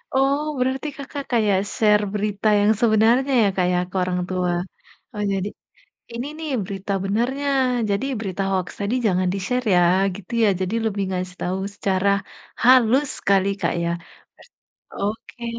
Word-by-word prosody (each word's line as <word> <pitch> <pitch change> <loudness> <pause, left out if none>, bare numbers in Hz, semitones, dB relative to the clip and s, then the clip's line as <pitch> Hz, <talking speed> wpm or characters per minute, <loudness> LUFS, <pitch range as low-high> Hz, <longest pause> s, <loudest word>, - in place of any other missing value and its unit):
Oh, 275 +2 +3 0.2
berarti 260 +3 -1
Kakak 280 0 -6
kayak 210 -5 +3 0.2
share 210 -1 +4
berita 210 0 -1
yang 205 +1 +4
sebenarnya 235 +4 +3
ya, - - +4
Kak, 180 - +2
ya, 180 - +2
ke 190 - -15
orang 180 0 -1
tua. 180 -1 0 0.6
Oh, 210 - -3
jadi, 195 +1 -1 0.7
"Ini 240 +3 -4
nih, 315 -2 -5
berita 195 +1 -5
benarnya, 245 +8 -1 0.4
jadi 200 +7 0
berita 195 -2 -3
hoaks 185 -1 -2
tadi 200 +4 -1
jangan 185 -2 +2
di-share 245 +6 -2
ya," 180 - +5 0.3
gitu 205 +4 -11
ya. - - +5
Jadi, 185 +4 -1
lebih 200 -2 -1
ngasih 185 0 -4
tahu 185 +2 -1 0.2
secara 195 0 0 0.6
halus 255 +3 +5
sekali, 195 0 +2
Kak, - - 0
ya. 170 - 0 1.0
Oke, 225 +3 -5
210 Hz, 150 wpm, -22 LUFS, 190-245 Hz, 1.0 s, ya